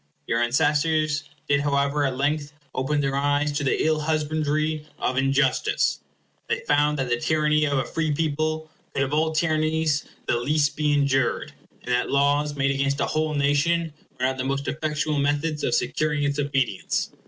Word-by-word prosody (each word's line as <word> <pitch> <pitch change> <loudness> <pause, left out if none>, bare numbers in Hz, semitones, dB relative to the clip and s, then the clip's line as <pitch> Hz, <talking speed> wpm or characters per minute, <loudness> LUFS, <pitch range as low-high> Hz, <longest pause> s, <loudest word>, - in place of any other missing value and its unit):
Your 115 +1 0
ancestors 150 +3 +1 0.2
did 140 0 +3
however 140 0 +1
at 130 -2 -2
length 145 +1 -1 0.2
open 145 +3 0
their 135 -1 -1
eyes 145 +1 +1
to 145 0 -2
the 135 - +1
ill 155 -1 +2
husbandry 155 0 -1
of 130 - -1
injustice. 135 0 +1 0.5
They - - 0
found 150 0 +2
that 135 -2 -1
the 120 0 0
tyranny 150 +1 +2
of 140 -2 0
a 135 - 0
free 160 -2 -1
people 155 +1 -1 0.3
could 140 - +2
of 135 +2 -3
all 160 +1 +2
tyrannies 155 -1 +1 0.2
the - - +1
least 145 +2 +1
be 150 -1 +1
endured, 135 -3 +1 0.3
and 125 - -4
that 125 - +1
laws 145 +1 +2
made 140 0 +1
against 140 +1 0
a - - +2
whole 155 0 -1
nation 145 +3 +1 0.3
were 125 - +1
not 130 0 0
the - - 0
most 140 +1 -2
effectual 150 -1 -1
methods 145 +2 0
of - - +1
securing 150 -1 0
its 140 0 0
obedience. 135 -8 -1
145 Hz, 175 wpm, -24 LUFS, 140-155 Hz, 0.5 s, did